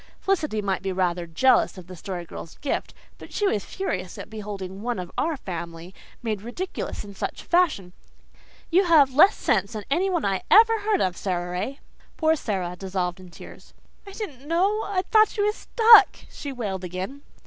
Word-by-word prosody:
Felicity 305 - -1
might 195 -2 -1
be 195 0 -2
rather 180 -2 -1
jealous 225 +7 +3
of 185 - -10
the 185 +1 -10
Story 180 0 -6
Girl's 165 - -9
gift, 280 - -3 0.2
but - - -12
she 415 - -1
was 210 - +1
furious 185 - -4
at - - -9
beholding 200 -3 -6
"one 240 0 -2
of 180 -1 -6
our 320 -2 -1
family" 170 -3 -7 0.3
made 215 -4 -2
ridiculous 245 - -5
in 200 -1 -10
such - - -5
a - - -22
fashion. 305 - +1 0.8
"You 370 +3 +4
have 295 -6 +5
less 350 +9 +6
sense 200 -1 0
than 215 -1 -5
anyone 355 +1 +1
I 195 -1 0
ever 450 +1 +6
heard 415 -1 +1
of, 180 -1 0
Sara 175 -2 -3
Ray." 205 +10 -4 0.4
Poor 315 0 +3
Sara 190 - -3
dissolved 185 -1 -3
in 185 -1 -12
tears. 170 - -14 0.3
"I 395 - -9
didn't 290 - -7
know. 385 +7 +2
I 380 -2 -1
thought 435 -1 +6
she 410 - -2
was 420 0 +2
stuck," 455 -1 +6 0.2
she 285 - -6
wailed 205 -7 -4
again. 185 +10 -5
215 Hz, 185 wpm, -25 LUFS, -, 0.8 s, less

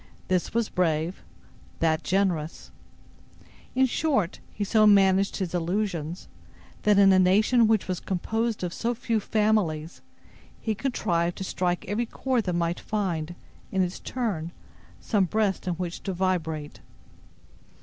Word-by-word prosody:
This 185 -1 +1
was 230 -1 0
brave, 165 -1 -1 0.6
that 160 0 +2
generous. 180 -5 -1 1.0
In 265 +1 +5
short, 260 - 0
he 210 - -3
so 215 +1 +4
managed 195 -1 +4
his 185 -3 -3
allusions, 175 -2 -2 0.5
that 210 -1 +4
in 195 -1 +7
a 185 - +5
nation 215 +6 +4
which 220 -2 +2
was 185 -2 -2
composed 220 +4 -2
of 175 -1 -2
so 235 +1 -1
few 230 -1 0
families, 205 -8 0 0.6
he 220 - -1
contrived 175 -8 -1
to - - -4
strike 180 -1 -1
every 220 +5 -1
chord 255 -3 -1
that 180 - -1
might 170 0 0
find, 175 -6 -2 0.4
in 190 -1 +2
its 180 0 -4
turn, 195 -10 -3 0.5
some 205 -4 +1
breast 200 -1 0
in 180 - 0
which 175 0 -5
to 195 - -3
vibrate. 165 -5 -2
190 Hz, 140 wpm, -26 LUFS, 175-215 Hz, 1.0 s, in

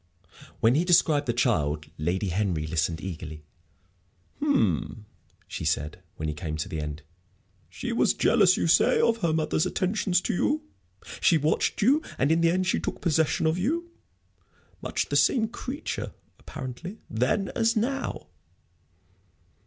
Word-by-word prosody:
When 115 +2 +5
he 155 +5 +2
described 160 -5 +3
the - - +3
child, 80 - 0
Lady 90 +5 -1
Henry 90 -4 -1
listened 80 +1 -1
eagerly. 80 -4 -7 1.0
"Hm," 110 - 0 0.4
she - - -6
said, 75 +1 -1
when 80 - -4
he 75 - -1
came 75 -1 -5
to 85 +3 -4
an 75 - -2
end; 75 +2 -6 0.7
"she - - -5
was - - +2
jealous, 185 -3 +4
you - - 0
say, 165 - +4
of 230 0 +3
her 170 -7 0
mother's 155 0 +1
attentions 185 -1 +1
to - - -2
you? 295 - 0 0.6
She 165 - +5
watched 155 +7 0
you, 280 +8 +4 0.2
and 140 +3 +2
in 165 +1 +3
the 165 - +4
end 185 +2 +1
she 190 - +1
took - - -4
possession 160 -1 +1
of 160 +3 +1
you? 335 - -1 0.9
Much - - -2
the - - -1
same 225 -4 +3
creature, 260 +6 -5 0.3
apparently, 145 - -7
then 130 - 0
as 230 +1 +1
now." 265 +5 -2
155 Hz, 150 wpm, -26 LUFS, -, 1.0 s, When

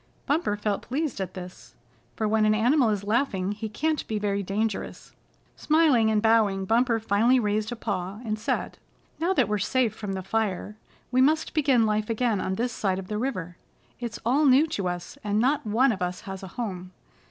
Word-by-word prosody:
Bumper 285 -8 0
felt 205 -1 -1
pleased 275 -4 -3
at 185 -1 -5
this, 180 -1 -10 0.4
for 220 - -1
when 215 0 +2
an 215 0 +4
animal 245 +3 +3
is 205 -2 -1
laughing 205 -4 0
he 215 +1 -5
can't 310 +7 -1
be 215 - -2
very 200 -1 -1
dangerous. 205 +2 -3 0.4
Smiling 300 -8 +3
and 215 0 +1
bowing, 215 -4 +3
Bumper 230 +2 +2
finally 225 +4 +3
raised 215 0 -1
a - - -3
paw, 200 -3 -4
and 215 -1 -2
said: 215 - -2 0.4
"Now 340 +4 +1
that 260 - +2
we're 210 0 -1
safe 235 +2 +1
from 205 -3 -5
the 190 -1 -4
fire, 210 0 -2 0.4
we 255 +1 +3
must 310 +4 +2
begin 270 -7 +3
life 215 0 0
again 225 -3 0
on 190 - -2
this 240 +3 -2
side 190 -4 -1
of 190 -1 -7
the 210 0 -2
river. 185 -9 -3 0.4
It's 235 -2 -5
all 275 +6 +3
new 275 +3 +6
to 195 -10 -2
us, 180 +10 -5
and 205 0 0
not 260 +2 +1
one 240 +5 +3
of 195 - -4
us 180 0 -2
has 195 -3 -7
a 190 - -7
home. 185 -6 -5
215 Hz, 200 wpm, -26 LUFS, 200-245 Hz, 0.4 s, new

